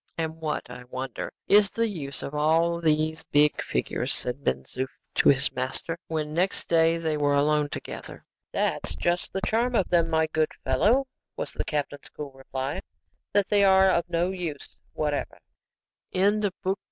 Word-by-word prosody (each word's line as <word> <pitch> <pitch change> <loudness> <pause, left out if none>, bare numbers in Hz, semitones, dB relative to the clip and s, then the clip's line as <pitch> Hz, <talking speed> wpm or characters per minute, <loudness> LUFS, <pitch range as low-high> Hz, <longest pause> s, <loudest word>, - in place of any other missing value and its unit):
"And 160 0 -2
what, 155 -2 -3
I 125 0 -9
wonder, 130 0 -5 0.2
is 205 -1 +6
the 230 +2 0
use 145 -9 -6
of 140 - -5
all 165 +3 +2
these 155 0 +1
big 150 0 +3
figures?" - - -2
said 125 +3 -2
Ben 65 +1 0
Zoof 130 - -4 0.3
to - - +4
his 140 0 +4
master, 130 +6 -2
when 155 -2 -2
next 180 +4 0
day 165 0 +4
they 160 -2 -1
were 145 -1 +2
alone 150 +1 +2
together. - - -7 0.3
"That's - - -1
just 175 +1 -1
the 195 - -3
charm 240 +3 +1
of 195 - +2
them, 170 -2 +3
my 160 0 +3
good 155 0 0
fellow," 215 - +3 0.3
was - - -4
the - - -3
captain's 145 -1 -3
cool 145 -2 -7
reply, 135 +4 -4 0.5
"that 200 -1 +2
they 205 -1 +4
are 190 -1 +6
of 170 0 0
no 175 +2 +1
use 170 -7 -5 0.2
whatever." 150 -1 -2 0.8
CHAPTER 205 +2 +3
VIII. 190 0 +2
160 Hz, 170 wpm, -26 LUFS, 145-185 Hz, 0.8 s, is